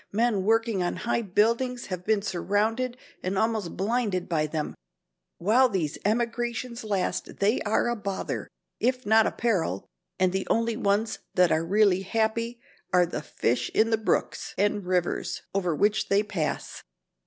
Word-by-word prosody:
Men 215 -3 +1
working 225 -2 +2
on 175 - -1
high 235 +5 -1
buildings 235 +5 +1
have 185 -2 -5
been 210 0 +1
surrounded 215 +6 0 0.2
and 185 +1 -2
almost 220 -4 0
blinded 205 -3 0
by 155 -3 +1
them. 150 0 -3 0.6
While 240 +8 +4
these 170 -7 -2
emigrations 235 +2 -1
last 200 -4 -2
they 210 +5 +2
are 215 - +2
a 240 - 0
bother, 200 -3 -4 0.3
if 255 +2 0
not 220 +1 +5
a - - 0
peril, 215 -9 0 0.3
and 185 -1 +2
the 190 0 -2
only 230 0 +1
ones 210 -1 0 0.2
that 180 -2 +4
are 160 - +2
really 195 +1 +3
happy 225 +4 -1 0.3
are 180 -1 +5
the 170 - -4
fish 125 -4 -1
in 225 +1 +3
the 225 - +4
brooks 220 - -1
and 205 -1 +1
rivers 180 -1 -1
over 180 -5 0
which 210 +5 +1
they 200 +1 +4
pass. 175 -7 -3
210 Hz, 155 wpm, -27 LUFS, 185-230 Hz, 0.6 s, not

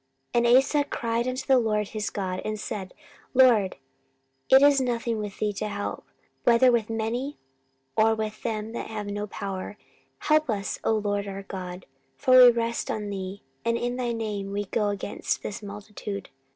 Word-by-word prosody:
14:014:011 235 0 +3
And 245 - +8
Asa 290 +2 +3
cried 235 -3 -1
unto 255 +1 -3
the 265 -2 +5
LORD 210 -3 0
his 215 -1 -3
God, 185 -2 -3
and 215 0 -3
said, 195 -2 -5 0.4
LORD, 235 -7 +5 0.7
it 265 +1 +8
is 285 -1 +6
nothing 235 -2 -1
with 205 -1 -5
thee 210 -1 0
to 210 +2 -3
help, 205 -1 -4 0.4
whether 245 +2 +6
with 230 -2 +1
many, 230 +6 -2 0.6
or 220 +1 +4
with 215 -1 -4
them 220 -1 -3
that 235 - -5
have 215 -2 -5
no 205 +1 -3
power: 195 0 -5 0.4
help 310 -2 +2
us, 200 -3 -2
O - - +2
LORD 205 -1 -1
our 195 0 -6
God; 180 -1 -7 0.3
for 260 -2 +4
we 250 -1 +11
rest 235 0 -1
on 210 -1 -3
thee, 195 0 -5 0.2
and 230 0 +1
in 245 +1 -2
thy 250 -1 -1
name 210 -4 -3
we 205 +1 -2
go 210 +2 0
against 205 0 -3
this 210 +2 -5
multitude. 205 -1 -7
215 Hz, 180 wpm, -26 LUFS, 205-235 Hz, 0.7 s, we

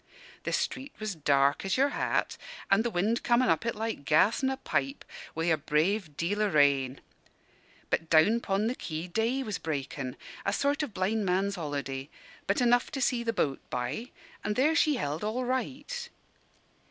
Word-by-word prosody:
"The - - -1
street 270 +2 -2
was 215 -2 -2
dark 140 -3 +2
as 195 +3 0
your 275 +2 +4
hat - - 0 0.4
and 200 +3 +5
the 235 - 0
wind 215 +4 +1
comin' 245 +1 +3
up 230 - +2
it 230 - 0
like 220 -7 -3
gas 155 - +4
in 265 - +2
a 265 - -2
pipe, 275 +1 -2 0.3
with 165 +1 +1
a 160 - +4
brave 155 +3 0
deal 205 +5 0
o' 210 - +3
rain. 140 -5 +3 0.9
But 165 - 0
down 185 +9 +5
'pon 200 -2 0
the 235 - +1
quay 160 -8 -5
day 225 +8 0
was 215 -5 -3
breakin' 140 -3 -4 0.3
a 200 - 0
sort 285 +6 +1
of 280 -9 -4
blind 205 +4 0
man's 195 +2 +1
holiday, 145 -5 -4 0.4
but 200 - +1
enough 245 0 +3
to 275 - -2
see 245 -1 +2
the 235 -1 0
boat 140 -10 0
by; 125 - -3 0.3
and 210 - -1
there 290 +7 +3
she 305 -2 +3
held 150 - -2
all 235 +4 -1
right. 270 - -3
205 Hz, 180 wpm, -29 LUFS, 155-240 Hz, 0.9 s, and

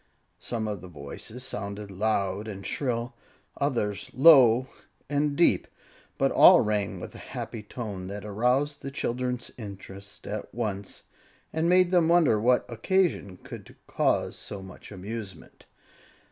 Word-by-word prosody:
Some 115 -3 -3
of 105 -4 -4
the 90 - -9
voices 85 - -8
sounded 100 -4 -5
loud 100 0 -1
and 100 -3 -7
shrill, 120 0 -2 0.4
others 105 -8 -1
low 130 -4 +7 0.5
and 145 0 +1
deep, 170 - +3 0.5
but - - +2
all - - +8
rang 105 -2 -1
with - - -8
a - - -10
happy 115 - -6
tone 105 -3 -6
that 100 +1 -6
aroused 125 +8 0
the 135 - -5
children's 125 -2 -3
interest 100 -1 -10
at 105 +1 -5
once, 100 -4 -4 0.5
and 160 +2 +1
made 180 0 +5
them 175 -3 +4
wonder 165 -10 +4
what 125 +2 +3
occasion 120 - 0
could - - -11
cause - - 0
so 100 -2 -8
much 95 +2 -12
amusement. 100 -2 -8
110 Hz, 135 wpm, -27 LUFS, 100-130 Hz, 0.5 s, all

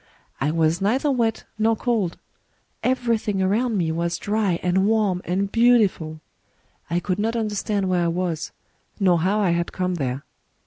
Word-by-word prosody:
I 135 - +1
was 165 +2 +1
neither 260 +9 +2
wet 230 -4 0 0.2
nor 225 +1 +3
cold: 220 -7 -1 0.6
everything 230 -5 0
around 215 +4 +1
me 165 -3 0
was 170 +1 -1
dry 205 -4 0
and 185 +2 +2
warm 210 -5 +1
and 195 +2 -1
beautiful. 210 -10 +3 0.7
I 170 +2 +1
could 185 +2 -2
not 225 +3 0
understand 210 -3 -1
where 180 -2 +1
I - - +2
was, 170 -2 -2 0.5
nor 180 -4 +4
how 190 +6 +1
I 195 -4 +2
had 170 0 -1
come 185 0 -1
there. 130 +1 -2
190 Hz, 160 wpm, -23 LUFS, 170-220 Hz, 0.7 s, nor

